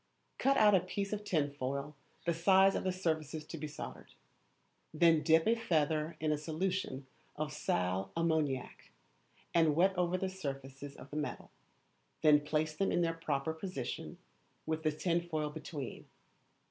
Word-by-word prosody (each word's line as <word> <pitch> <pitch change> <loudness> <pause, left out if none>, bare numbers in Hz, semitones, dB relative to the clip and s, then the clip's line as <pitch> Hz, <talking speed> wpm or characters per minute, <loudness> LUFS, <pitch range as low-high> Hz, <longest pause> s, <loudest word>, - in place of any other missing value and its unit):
Cut 275 +1 +3
out 210 -1 +6
a 190 - +7
piece 200 +3 -3
of 210 0 -3
tinfoil 140 -5 -1 0.3
the 170 - +2
size 190 +3 +5
of - - -1
the 185 - +1
surfaces 160 -4 -2
to 165 - -7
be 155 -1 -4
soldered. 150 - -9 0.8
Then 160 0 +4
dip 160 0 +4
a 225 - +5
feather 160 -7 0
in 155 0 +1
a 150 - 0
solution 160 -3 -2 0.3
of 150 0 -3
sal 90 +2 -1
ammoniac, 155 -6 -1 0.6
and 160 -3 +4
wet 190 +4 +4
over 180 0 +1
the 190 - -1
surfaces 140 -6 -6
of 135 - -12
the 150 - -4
metal, 150 -1 -4 0.7
then 150 -1 +7
place 155 +1 -1
them 195 +4 +1
in - - +2
their 165 -1 +1
proper 160 -2 -2
position 160 -7 -5 0.5
with 160 0 -1
the 155 -1 +2
tinfoil 165 -1 -1
between. 150 -3 -7
160 Hz, 155 wpm, -34 LUFS, 150-175 Hz, 0.8 s, a